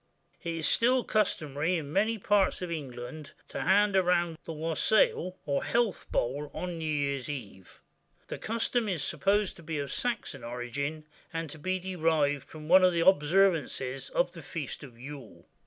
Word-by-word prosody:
[IT 170 -1 -2
is 160 -1 0
still 250 +2 +3
customary 165 -5 0
in 150 -2 -6
many 220 +4 +2
parts 200 -2 +2
of 175 - -4
England 140 -1 -6
to - - -5
hand 205 +2 +4
round 175 -3 +3
the - - -5
wassail, 165 +3 +2
or 140 -1 0
health 235 -2 0
bowl, 140 +5 -1
on 175 -2 -4
New 160 -1 -2
Year's 140 -3 -1
Eve. 100 -10 -8 0.5
The - - -5
custom 230 0 0
is 170 -7 0
supposed 205 0 +1
to - - -12
be 160 -1 -4
of 140 -2 -3
Saxon 240 -3 -2
origin, 135 +6 -4 0.3
and 165 -3 -4
to 155 - -9
be 185 +4 -1
derived 160 -6 0
from 155 -1 -10
one 185 +3 +7
of 180 -1 +5
the 170 -1 +1
observances 155 -6 +3
of - - +1
the - - -10
Feast 155 -6 -5
of 125 -5 -12
Yule. 135 -10 -10
165 Hz, 170 wpm, -29 LUFS, 145-190 Hz, 0.5 s, one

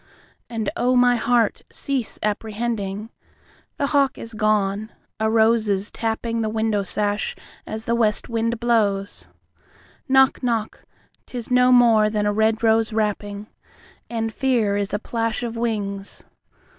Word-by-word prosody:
And 225 +3 -2
oh, 255 -6 +2
my 245 0 +5
heart, 235 -2 +1
cease 270 -5 -2
apprehending! 215 0 -3 0.7
The 280 - 0
hawk 275 -2 +3
is 230 - -7
gone, 215 0 0 0.3
a 220 0 +1
rose 220 0 +3
is 200 +1 -1
tappingThe 225 -1 -2
window 220 -2 0
sash 205 +2 -2 0.3
as 220 0 -5
the 235 - 0
west 220 -3 +1
wind 230 0 -1
blows. 210 -4 0 0.8
Knock, 265 0 +4
knock, 230 -4 -2 0.5
'tis 245 -1 -7
no 250 0 +5
more 230 -4 +5
than 210 -1 -1
a 205 - +1
red 220 +1 +1
rose 225 0 +3
rapping, 210 -1 -2 0.6
And 225 -1 -2
fear 235 -7 +1
is 205 0 -1
a - - 0
plash 230 +1 -2
of 235 -1 -4
wings. 205 -4 -3
225 Hz, 135 wpm, -22 LUFS, 210-235 Hz, 0.8 s, my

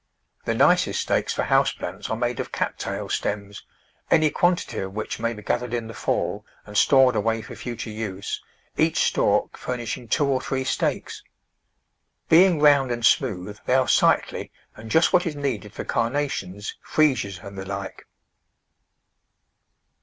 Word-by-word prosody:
The - - 0
nicest - - +3
stakes - - 0
for - - -1
house - - +3
plants - - -6
are 110 - -1
made 120 0 -1
of - - -4
Cat - - -2
tail - - -4
stems, 100 0 -3 0.5
any 155 -2 +4
quantity 175 +3 0
of 95 0 -5
which 110 - -4
may 115 +1 0
be 105 -2 -9
gathered 120 0 -1
in 115 -1 -3
the 115 - -8
fall - - -2 0.2
and 105 - -11
stored 130 +1 +5
away 110 +1 0
for 120 +1 -9
future 120 -2 -6
use, 105 -3 -5 0.4
each 160 0 +2
stalk - - +1
furnishing 120 -1 -4
two 145 +5 +2
or 135 -2 +1
three 130 0 -2
stakes. 130 - -2 1.1
Being 175 0 +6
round 145 -3 +5
and 120 -1 -1
smooth 105 -6 +1
they 125 - +3
are 130 -1 +3
sightly - - +2 0.2
and 110 +1 -10
just 160 - +3
what 180 -1 +4
is 155 - -3
needed 125 -8 -3
for - - -6
Carnations, 115 -6 -2
Freesias 125 -11 +1
and 100 0 -9
the 95 - -5
like. 100 0 -6
120 Hz, 160 wpm, -24 LUFS, 105-140 Hz, 1.1 s, Being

